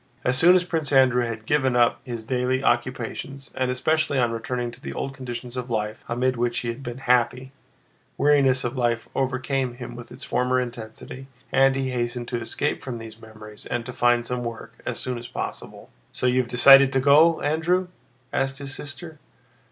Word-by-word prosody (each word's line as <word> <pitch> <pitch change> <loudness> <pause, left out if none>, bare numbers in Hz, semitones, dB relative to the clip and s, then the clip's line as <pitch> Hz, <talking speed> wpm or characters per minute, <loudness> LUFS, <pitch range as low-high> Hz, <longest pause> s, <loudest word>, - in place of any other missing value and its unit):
As 125 - +2
soon 175 +7 +6
as 180 - +3
Prince 160 -5 -2
Andrew 130 -3 +4
had 110 -1 -6
given 130 -1 +1
up 120 -1 +3
his 120 -3 -6
daily 130 +2 0
occupations, 130 +3 -2
and 130 -1 -1
especially 145 +3 +1
on 120 -2 +2
returning 120 +1 -3
to - - -16
the 70 - -6
old 135 - -4
conditions 125 -2 -7
of 125 0 -4
life 105 -2 -3
amid 125 +1 0
which 120 0 0
he 120 - -3
had 115 +4 -5
been 120 -2 -6
happy, 125 0 +1 0.7
weariness 135 -3 +3
of 120 +2 -3
life 120 -2 0
overcame 130 -1 -1
him 120 -1 -8
with 120 -1 -10
its 125 +2 -11
former 125 0 +1
intensity, 120 +2 -7 0.2
and 135 0 +4
he 135 -1 -1
hastened 120 -1 -3
to 120 -1 -2
escape 145 +6 -2
from 125 -3 -5
these 115 0 -10
memories 110 -1 -12
and 120 -1 -3
to 125 - -7
find 120 0 +2
some 125 0 -3
work 115 -1 -7
as - - -2
soon 125 -1 -4
as 120 - -9
possible. - - -7 0.2
"So - - -4
you've 125 0 +2
decided 135 +3 +7
to 135 - +3
go, 150 +5 +5
Andrew?" 165 +5 +1 0.5
asked 135 0 0
his 140 0 -7
sister. 155 +2 -9
125 Hz, 190 wpm, -24 LUFS, 120-135 Hz, 0.7 s, decided